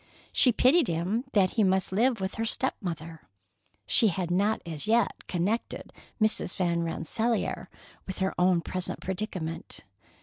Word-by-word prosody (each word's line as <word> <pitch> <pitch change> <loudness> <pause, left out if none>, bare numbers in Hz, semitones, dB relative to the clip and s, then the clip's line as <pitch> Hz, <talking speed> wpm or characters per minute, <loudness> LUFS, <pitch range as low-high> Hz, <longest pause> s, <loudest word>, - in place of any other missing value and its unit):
She 250 - +5
pitied 275 +8 +4
him 180 +9 -1
that 190 -3 +4
he 220 - +2
must 190 -1 +1
live 230 +4 +2
with 190 +1 -3
her 225 - -3
step 260 +3 0
mother. 165 -3 -6 0.6
She 225 - +4
had 175 -2 -1
not 200 +4 +2
as 160 +1 -1
yet 230 -1 +1
connected 190 +6 -2 0.3
Mrs. 215 -4 0
Van 170 -2 0
Rensselaer 215 +8 -2 0.4
with 190 - -5
her 190 0 0
own 180 -1 +3
present 185 +1 -4
predicament. 185 -4 -4
190 Hz, 145 wpm, -28 LUFS, 170-220 Hz, 0.6 s, She